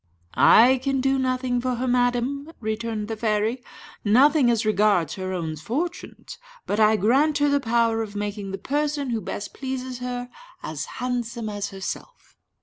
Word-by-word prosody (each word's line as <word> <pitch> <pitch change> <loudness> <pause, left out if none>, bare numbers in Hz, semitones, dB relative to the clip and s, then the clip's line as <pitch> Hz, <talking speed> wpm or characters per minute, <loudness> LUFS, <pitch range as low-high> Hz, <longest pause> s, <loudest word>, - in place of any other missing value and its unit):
"I 255 +3 +6
can 270 0 0
do 270 +1 +1
nothing 255 -1 0
for 255 0 -1
her, 255 +2 -2
madam," 250 +4 0
returned 220 -1 -3
the 225 - -3
fairy 220 +3 0 0.4
"nothing 260 +5 +5
as 230 -2 +1
regards 205 -5 +2
her 185 -1 -4
own 165 -4 -3
fortunes; 290 - -5 0.3
but 205 - -1
I 215 0 +5
grant 270 +9 +3
her 290 0 +2
the 285 0 +3
power 230 -2 +1
of 210 -2 -6
making 205 -1 -4
the 195 - -4
person 290 0 -1
who 225 -2 -1
best 205 - -6
pleases 260 -2 -5
her 245 0 -5 0.3
as - - -4
handsome 240 -2 -3
as 205 -1 -4
herself." 195 - -8
240 Hz, 160 wpm, -24 LUFS, 215-260 Hz, 0.4 s, I